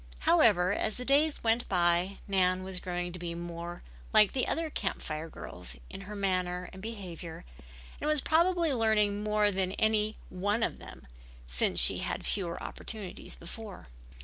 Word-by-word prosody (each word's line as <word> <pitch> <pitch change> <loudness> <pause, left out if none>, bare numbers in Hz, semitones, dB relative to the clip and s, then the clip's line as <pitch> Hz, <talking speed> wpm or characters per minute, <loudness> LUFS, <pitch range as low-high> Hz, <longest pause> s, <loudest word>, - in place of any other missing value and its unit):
However, 180 - +5
as 215 +1 0
the 250 - -6
days 290 +3 +3
went 230 +1 +2
by 175 +1 +2
Nan 185 -2 +2
was 190 -1 -3
growing 175 -1 -3
to 180 - -6
be 170 -1 -4
more 170 0 -6 0.3
like 210 -2 +7
the 255 - +1
other 325 -1 -1
Camp 195 - -2
Fire 155 +1 -4
girls 90 - -7 0.2
in 195 - -7
her 205 +2 -7
manner 180 -2 -1
and 190 - -9
behavior, 180 - -7 0.5
and - - -2
was 305 -1 +4
probably 335 +1 +3
learning 215 -3 +2
more 210 0 +2
than 190 -1 -1
any 215 0 +1
one 205 +5 0
of - - -1
them, - - -11 0.4
since - - 0
she - - +4
had - - -2
had - - -9
fewer 175 -4 0
opportunities 210 -5 -5
before. 200 - -9
195 Hz, 170 wpm, -30 LUFS, 175-220 Hz, 0.5 s, like